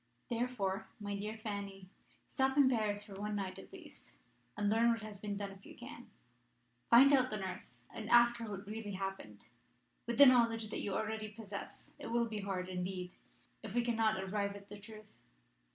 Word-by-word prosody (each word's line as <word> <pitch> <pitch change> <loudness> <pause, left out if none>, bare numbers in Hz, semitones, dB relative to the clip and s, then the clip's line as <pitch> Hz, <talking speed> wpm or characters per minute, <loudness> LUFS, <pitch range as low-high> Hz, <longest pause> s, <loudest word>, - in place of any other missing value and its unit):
"Therefore, 225 -4 -1
my 205 -1 -3
dear 210 +2 -4
Fanny, 200 -3 -5 0.4
stop 265 0 +1
in 280 -2 +7
Paris 215 -5 +1
for 210 -1 -11
one 210 0 -2
night 190 -2 -3
at - - -12
least, - - -12 0.4
and 205 0 +1
learn 225 +3 +4
what 230 -2 0
has 210 -2 -8
been 205 -1 -3
done 200 -1 -4
if 195 0 -14
you - - -12
can. 245 0 -10 0.8
Find 270 +4 +8
out 255 -2 +5
the 215 - -2
nurse, 185 - -7
and 220 0 -6
ask 240 0 +6
her 230 -2 -5
what 200 0 -6
really 210 0 -5
happened. 190 - -6 0.6
With 235 -1 -1
the 285 - +11
knowledge 230 -4 +4
that - - -2
you 200 -2 -2
already 220 0 -2
possess, 210 -2 -8
it - - -6
will 235 0 +2
be 220 -2 -4
hard, 190 -2 -3
indeed, 180 0 -4 0.5
if 220 -1 -7
we 240 - +3
cannot 225 -3 +2
arrive 200 +1 -1
at 200 0 -12
the 205 0 -9
truth. 215 +1 -11
210 Hz, 190 wpm, -35 LUFS, 195-230 Hz, 0.8 s, the